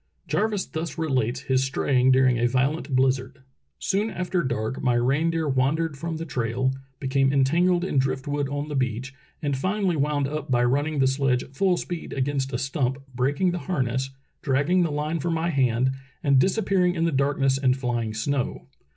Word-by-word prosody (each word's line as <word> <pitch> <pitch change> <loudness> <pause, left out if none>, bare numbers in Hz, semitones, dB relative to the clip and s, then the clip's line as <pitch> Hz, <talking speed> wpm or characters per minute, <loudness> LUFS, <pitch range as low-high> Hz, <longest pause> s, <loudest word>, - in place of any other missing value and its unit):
Jarvis 210 -3 0
thus 165 0 -5
relates 130 -6 0
his 130 -1 +1
straying 135 -1 +2
during 130 -2 +4
a 120 - +3
violent 135 +3 0
bliz 130 0 +3
zard: 130 +1 -12 0.3
Soon 205 +3 0
after 180 -3 -1
dark 130 -4 -2
my 125 -2 +2 0.3
deer 165 -2 -1
wandered 145 +4 +1
from 165 +3 -4
the 165 - -5
trail, 130 -1 -1 0.3
became 135 0 +1
entangled 170 +6 +3
in 140 - +1
drift 135 +1 -1
wood 145 -1 -1
on 145 +1 -3
the 150 - -4
beach, 130 0 -2 0.3
and 140 -2 0
finally 185 +5 0
wound 145 -1 0
up 150 0 -5
by 120 -1 +3
running 145 +5 +1
the 135 - +3
sledge 135 -1 +1
full 180 +5 +1
speed 175 -2 -5
against 135 0 -1
a 120 - -1
stump, 135 0 -1 0.2
breaking 140 +8 +1
the 175 - -3
harness, 130 -5 0 0.3
dragging 145 +6 +2
the 170 - +1
line 150 +3 -2
from 165 +3 -1
my 165 +1 0
hand, 130 -2 +2 0.3
and 140 -2 +4
disappearing 185 0 +2
in 165 -1 +1
the 165 - +1
darkness 135 -1 +1
and 130 -1 +2
flying 120 -4 -2
snow. 130 +4 -2
140 Hz, 180 wpm, -25 LUFS, 130-160 Hz, 0.3 s, during